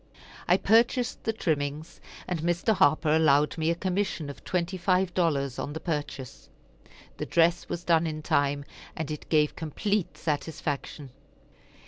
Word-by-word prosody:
I - - +5
purchased 235 +3 +2
the 225 - +2
trimmings, 155 -5 -3 0.3
and 175 -4 -2
Mr. 175 +5 +1
Harper 155 -3 +3
allowed 150 -2 +4
me 160 -1 0
a 170 - +2
commission 180 -4 -2
of - - -15
twenty 180 +1 -1
five 180 0 +1
dollars 140 -7 0
on 145 - -4
the 160 - -4
purchase. 145 - -5 0.7
The - - -4
dress 170 +1 +2
was 175 - -4
done 165 -1 +3
in 155 -1 -5
time, 145 -1 +1 0.3
and 155 -2 -4
it 150 - -7
gave 150 -2 +3
complete 165 +1 -2
satisfaction. 150 -2 -3
160 Hz, 145 wpm, -27 LUFS, 145-175 Hz, 0.7 s, I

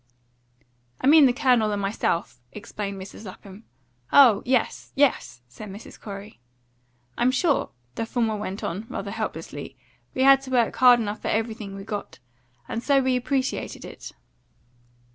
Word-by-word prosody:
"I - - -3
mean 295 0 +8
the - - +3
Colonel 245 -5 +2
and 205 - -1
myself," 195 - -2
explained 200 -1 -6
Mrs. 190 +3 -10
Lapham. 195 +3 -12 0.5
"Oh 240 -8 +7
yes 255 -2 0
yes!" 130 - +1
said 200 - -10
Mrs. 200 +3 -11
Corey. 200 - -9 0.8
"I'm 245 - +4
sure," 285 +3 +1 0.2
the 225 - -4
former 225 -3 0
went 205 -1 -5
on, 195 +7 -4
rather - - -5
helplessly, - - -6 0.4
"we 260 - +2
had 270 0 +7
to 270 - -10
work 245 -3 +2
hard 250 -1 +7
enough 210 -1 -3
for - - -4
everything 220 -3 -2
we 195 - -8
got. 205 -1 -6 0.5
And 225 - -3
so 280 +2 +3
we 260 -1 +1
appreciated 260 +1 -2
it." - - -10
225 Hz, 150 wpm, -25 LUFS, 200-260 Hz, 0.8 s, mean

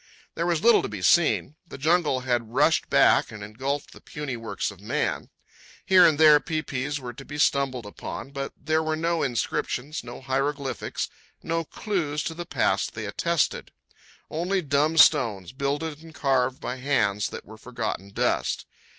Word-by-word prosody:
There 170 - -2
was 170 -2 0
little 235 -1 +6
to - - -3
be 105 -4 -6
seen. 155 - +3
The - - -9
jungle 155 -2 +2
had 120 -2 -2
rushed - - +3
back - - +4
and 105 -2 -8
engulfed 135 +8 -4
the - - -15
puny 150 -4 -5
works 110 -4 -3
of 100 - -15
man. 105 - -2 0.6
Here 185 -2 +7
and 155 -2 +1
there 155 -2 +8
pai 155 +1 -3
pais 140 +1 -3
were 125 -2 -7
to 135 +3 -10
be 145 +1 -8
stumbled 135 -5 +1
upon, 105 +6 -7
but 140 0 -4
there 160 0 0
were 155 0 -1
no 165 +1 0
inscriptions, 130 +2 -2
no 120 0 -8
hieroglyphics, 135 +1 -2 0.4
no 165 0 -1
clues 160 -4 -2
to 165 - -3
the 170 +1 -7
past 95 - 0
they 110 -1 -4
attested—only 170 - -3
dumb 150 +3 +1
stones, 115 - +4
builded 145 +3 -3
and 165 -1 -14
carved 130 -2 +1
by 125 - -4
hands 110 -7 +1
that - - -8
were 110 +1 -13
forgotten 110 -5 -4
dust. - - -1
140 Hz, 165 wpm, -25 LUFS, 120-155 Hz, 0.6 s, there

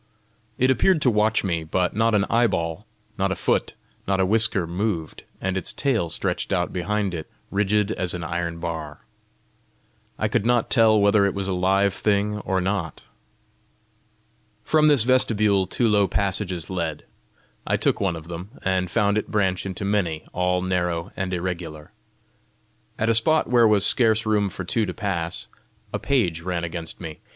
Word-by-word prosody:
It 130 +1 +3
appeared 165 +7 +3
to 125 - +4
watch 110 +1 +2
me, 85 -4 -1
but 90 +4 -1
not 115 0 +2
an 100 -1 +2
eyeball, 85 -9 0 0.3
not - - +1
a - - 0
foot, - - 0 0.3
not 95 0 +1
a 95 - +3
whisker 110 -2 +3
moved, 85 -2 -3
and 95 0 -2
its 95 - -2
tail 115 - 0
stretched 90 +3 -2
out 90 -2 0
behind 100 +1 -1
it 80 -2 -6 0.2
rigid 105 +1 +1
as 90 -5 0
an 85 - -5
iron 85 0 -3
bar. 80 -3 -6 1.1
I - - 0
could - - 0
not 120 0 +1
tell 110 -3 +5
whether 100 0 +4
it 100 - -3
was 100 -1 -2
a 95 - -1
live 95 +2 +2
thing 105 0 0
or 95 -2 -1
not. 95 -4 -3 1.6
From 155 -1 +3
this 145 -7 +5
vestibule 105 -6 +2
two 120 +5 0
low 105 -2 +3
passages 95 -2 -2
led; 80 -5 -3 0.6
I - - +2
took - - 0
one 95 -4 0
of 80 0 -9
them, 85 +3 -7 0.2
and 95 -1 0
found 105 0 +2
it - - -7
branch 95 -3 0
into 95 +1 -5
many, 90 -6 -1
all 90 0 0
narrow 90 -1 -1
and 95 -1 -3
irregular. 85 -4 -5 1.1
At 115 - 0
a - - +4
spot 155 +8 +3
where 120 -2 +6
was 105 -2 +3
scarce 110 -2 +2
room 105 -2 +1
for 90 - -6
two 105 +4 0
to 90 - -5
pass, 85 -6 -3 0.5
a - - -1
page 100 -13 0
ran 85 -1 -3
against 85 -1 -6
me. 80 -3 -8
95 Hz, 170 wpm, -23 LUFS, 85-105 Hz, 1.6 s, where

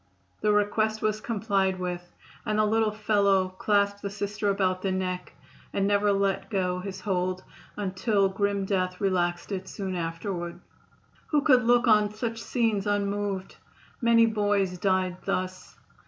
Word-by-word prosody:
The 210 - +3
request 215 +1 +1
was 215 0 0
complied 200 -4 0
with, 180 -1 -3 0.4
and 215 - -1
the 215 - +4
little 220 +1 +2
fellow 200 -3 +2
clasped 200 +1 +1
the 200 - -3
Sister 205 0 -2
about 185 -2 +1
the 195 - -1
neck 185 -1 -3 0.4
and 195 - 0
never 205 0 +3
let 195 -1 0
go 180 -3 0
his 190 0 -6
hold 185 -1 -1 0.3
until 200 +1 +1
grim 200 0 -1
death 185 -2 -1
relaxed 175 -2 0
it 190 -1 -4
soon 190 -2 -4
afterward. 170 +1 -4 0.7
Who 295 -2 +2
could 255 -6 +5
look 240 +1 +4
on 210 -2 +4
such 230 0 -3
scenes 225 -5 0
unmoved! 200 -1 -2 0.4
Many 230 -1 +5
boys 205 -4 0
died 185 -1 +1
thus. 185 -1 -3
200 Hz, 145 wpm, -27 LUFS, 185-210 Hz, 0.7 s, could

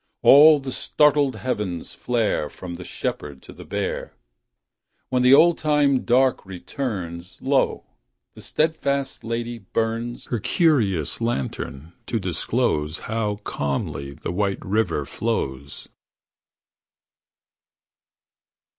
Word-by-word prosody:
All 150 +2 +8
the 135 -1 -6
startled 145 -2 +2
heavens 105 -8 -3
flare 115 -10 -1
From 90 -2 -8
the 90 +1 -7
Shepherd 70 -5 -5
to - - -12
the - - -11
Bear - - -4 0.9
When 125 -1 +1
the 125 +2 +7
old 170 +3 +5
time 145 -3 +2
dark 130 +2 +3
returns, 90 - -6
Lo, - - +1 0.5
the - - -13
steadfast 140 -5 -1
lady 115 +1 -3
burns 115 +3 -3
Her 120 - -2
curious 110 - +1
lantern 80 - -3
to 115 - -1
disclose 90 -3 -1
How 105 -1 -2
calmly 70 0 -3
the - - -5
White 100 +1 -1
River 95 -8 0
flows! 70 - -4
115 Hz, 105 wpm, -23 LUFS, 85-130 Hz, 0.9 s, All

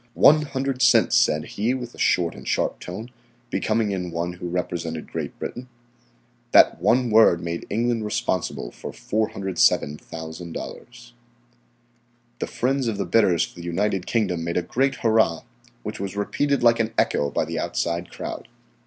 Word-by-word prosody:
"One 155 +1 +7
hundred 135 -2 -3
cents," 125 -1 +5
said 75 0 +3
he 115 +5 -1
with 120 -2 -6
a - - -15
short 85 -2 +2
and - - -11
sharp - - 0
tone, 110 +7 -7 0.4
becoming 110 -1 0
in 90 -2 -3
one 85 +1 -3
who 90 0 -6
represented 85 -2 -3
Great - - -5
Britain. 125 +1 -6 0.8
That - - +6
one 120 +5 +3
word 110 -6 +6
made 85 0 -5
England 115 +1 0
responsible 105 - -2
for - - -8
$407,000. 90 +2 -2 1.3
The - - -2
friends 130 +1 0
of 110 -3 -1
the 100 - -1
bidders 90 -2 +3
for - - -15
the 85 - -10
United 95 +2 -1
Kingdom 95 -8 0
made 85 +1 -2
a 90 - +1
great 135 +8 0
hurrah, 110 -8 +3 0.4
which 105 - -5
was 100 0 -4
repeated 140 +6 0
like 115 -1 +5
an 115 0 -1
echo 70 - +2
by - - -1
the - - -3
outside 85 +1 -2
crowd. - - -7
100 Hz, 155 wpm, -24 LUFS, 85-120 Hz, 1.3 s, One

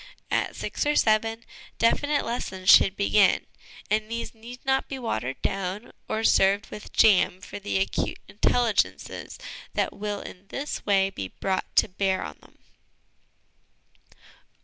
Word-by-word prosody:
At - - 0
six - - -3
or 295 - +2
seven, 225 0 +2 0.3
definite 290 +5 +2
lessons 190 -5 +1
should 195 - +7
begin, 200 0 +3 0.5
and 215 0 +1
these 230 0 -4
need 235 +3 -12
not 265 0 +1
be 270 - -5
watered 135 - -3
down 195 +3 -3 0.2
or 220 +1 -1
served 200 -1 +3
with 210 - -9
jam 195 -4 +4
for 190 - -8
the 200 -1 -2
acute 195 - -1
intelligences 225 +1 0 0.4
that - - 0
will 205 0 -4
in 190 +2 -11
this 280 +7 -4
way 195 -1 +3
be 95 - -5
brought 190 - -3
to - - +5
bear 190 -1 -1
on 75 - -8
them. - - -21
210 Hz, 140 wpm, -26 LUFS, 190-230 Hz, 0.5 s, should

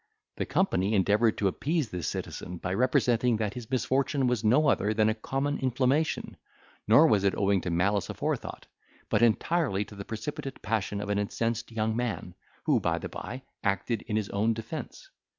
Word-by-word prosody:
The - - -2
company 105 - +1
endeavoured 105 +3 +3
to 100 - +2
appease 145 - -1
this 90 -4 -3
citizen, 90 - -5
by 95 +2 -3
representing 120 +1 +2
that 105 -2 -2
his 120 -3 -8
misfortune 135 +1 +1
was 125 -3 +1
no 130 +8 +4
other 110 -5 +2
than 110 0 +3
a - - +2
common 135 +6 -2
inflammation, 130 +4 0 0.5
nor 115 +9 +7
was 105 -10 +3
it 100 - +2
owing 100 -2 +2
to - - -3
malice 90 +3 +1
aforethought, - - -3 0.5
but - - +2
entirely 120 - +2
to 105 - -13
the 100 -1 -7
precipitate 135 +6 -6
passion 105 -1 -1
of 105 - -5
an 100 0 +1
incensed 115 +3 -2
young 110 -1 -1
man, 115 -7 -3 0.3
who, - - +3
by - - 0
the - - -5
bye, 130 +2 -7 0.2
acted 100 +3 0
in 105 - -2
his 110 -2 -1
own 110 +3 +1
defence. 115 +5 -7
110 Hz, 180 wpm, -28 LUFS, 100-130 Hz, 0.5 s, nor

